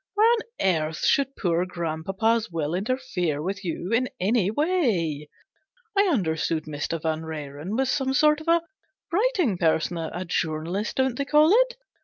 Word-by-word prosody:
Why 420 - +3 0.4
on - - +2
earth 155 -1 -3
should 275 -1 +2
poor 175 -2 +1
grandpapa's 185 +6 -1
will 160 -2 -2
interfere 195 - -1
with 195 +5 -4
you 175 +2 -4
in 250 +2 +2
any 200 0 +2
way? 210 - 0 0.7
I 400 0 +4
understood 160 - 0
Mr. 155 +2 -3
Vanrenen 155 +2 -4
was 265 0 +1
some 265 -2 0
sort 300 +1 +4
of 315 - -12
a 335 0 +4 0.5
writing 365 - +1
person 165 +1 +1
a 170 +3 -4
journalist, 170 +5 -2
don't 260 -2 +1
they 280 - -2
call 300 +3 +5
it - - +3
190 Hz, 150 wpm, -25 LUFS, 160-265 Hz, 0.7 s, call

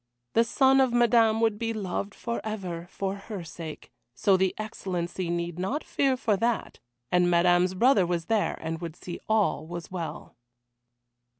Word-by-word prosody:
The 230 - +5
son 265 +3 +4
of 260 -2 +3
Madame 230 -2 +4
would 220 -2 +2
be 230 -1 -1
loved 200 -1 -3
forever, 195 -7 -4
for 195 0 -3
her 200 -1 -7
sake, 160 -1 -9 0.2
so 195 +8 +3
the 190 0 +2
Excellency 185 -4 -4
need 170 0 -2
not 250 +12 -2
fear 270 -2 +1
for 220 -4 +1
that, 230 +3 -1 0.3
and 180 0 +4
Madame's 175 +1 +3
brother 215 -3 +4
was 170 -2 -1
there, 220 -2 0
and 160 0 -4
would 165 -2 -5
see 175 -1 -7
all 210 -8 +1
was 175 +1 -7
well. 170 -3 -6
190 Hz, 160 wpm, -27 LUFS, 175-225 Hz, 0.3 s, The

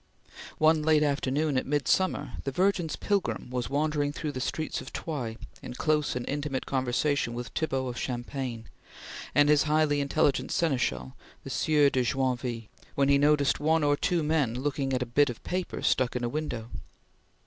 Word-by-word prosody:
One 155 0 +4
late 155 0 +4
afternoon, 145 0 +1
at - - -7
midsummer, 145 0 +1
the 135 - -2
Virgin's 180 0 +1
pilgrim 200 -10 -1
was 125 -2 -2
wandering 145 0 0
through 150 0 -4
the 130 -2 -5
streets 155 +4 -2
of - - -10
Troyes 125 -9 -4 0.2
in 125 - -8
close 150 0 +1
and 125 -1 -4
intimate 145 -2 -2
conversation 130 -1 0
with 120 0 -5
Thibaut 135 -5 -1
of 120 -1 -5
Champagne 120 -2 -4 0.7
and 145 +1 +6
his 150 -1 +5
highly 150 -1 +3
intelligent 140 -2 +1
seneschal, 115 - 0 0.3
the - - -7
Sieur 150 -2 +3
de 130 - +1
Joinville, 125 -3 -1 0.3
when 140 0 +2
he 140 0 +5
noticed 145 -1 +3
one 160 +1 +2
or 145 0 +3
two 170 +2 0
men 150 -6 +1
looking 135 +1 -2
at 125 -1 +1
a - - -5
bit 140 +4 +3
of 120 - -7
paper 180 0 -3
stuck 130 -1 +2
in 125 - -2
a 120 - 0
window. 120 -5 -4
140 Hz, 170 wpm, -28 LUFS, 125-150 Hz, 0.7 s, and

